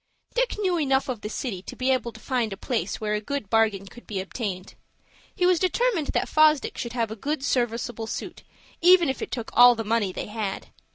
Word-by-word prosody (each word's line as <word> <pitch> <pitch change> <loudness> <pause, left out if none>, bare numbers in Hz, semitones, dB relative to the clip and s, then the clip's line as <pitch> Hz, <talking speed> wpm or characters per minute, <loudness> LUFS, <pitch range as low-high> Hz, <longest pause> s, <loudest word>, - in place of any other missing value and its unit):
Dick - - 0
knew 370 -5 0
enough 270 -2 +1
of 240 -5 -3
the 210 - -5
city 215 -5 -4
to - - -9
be 260 +1 0
able 255 -2 0
to - - -14
find 245 -5 -1
a 195 - -5
place 240 +2 -2
where 210 -1 -2
a 210 - -1
good 220 -2 -4
bargain 220 -3 +2
could 240 +5 -14
be 205 -4 -3
obtained. 190 -1 -5 0.6
He 360 - +1
was 360 -2 +4
determined 375 - +1
that - - 0
Fosdick 310 -1 +3
should 235 -1 -5
have 230 -3 -1
a - - -4
good 280 +5 -3
serviceable 235 -3 -1
suit, - - -6 0.4
even 350 -2 +6
if 265 - -3
it - - -4
took 235 -3 -5
all 245 0 +8
the 225 - -3
money 215 -3 0
they - - -5
had. 210 -2 -4
240 Hz, 220 wpm, -25 LUFS, 215-290 Hz, 0.6 s, all